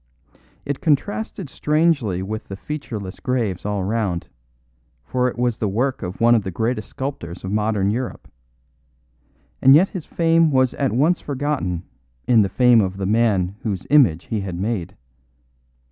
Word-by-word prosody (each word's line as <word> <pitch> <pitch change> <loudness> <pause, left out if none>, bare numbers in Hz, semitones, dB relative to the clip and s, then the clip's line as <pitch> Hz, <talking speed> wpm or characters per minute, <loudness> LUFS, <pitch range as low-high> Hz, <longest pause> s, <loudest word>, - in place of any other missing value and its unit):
It 140 -1 -3
contrasted 195 - -1
strangely 145 - +1
with 110 +3 -5
the 95 - -6
featureless 110 -7 -6
graves 110 -7 -2
all 105 -2 -1
round, 100 -4 -2 0.8
for 125 - 0
it 125 - -4
was 120 -2 0
the 110 - 0
work 125 +7 -1
of 90 0 -6
one 120 +1 +5
of 115 - +4
the 95 - -5
greatest 110 +4 -2
sculptors 115 -11 -6
of 95 - -4
modern 105 -2 +1
Europe; 125 +3 -4 1.3
and 135 +1 +8
yet 180 +6 +5
his 180 -5 -7
fame 165 -1 +3
was 130 -3 +2
at 135 -2 -1
once 150 +9 +2
forgotten 135 - -2 0.4
in 115 -3 +5
the 100 - +1
fame 125 -1 +5
of 95 -1 -2
the 95 - -3
man 100 -3 +1
whose 100 -5 -3
image 115 - +5
he 110 - -2
had 95 -3 -5
made. 95 -1 -3
115 Hz, 160 wpm, -21 LUFS, 95-135 Hz, 1.3 s, and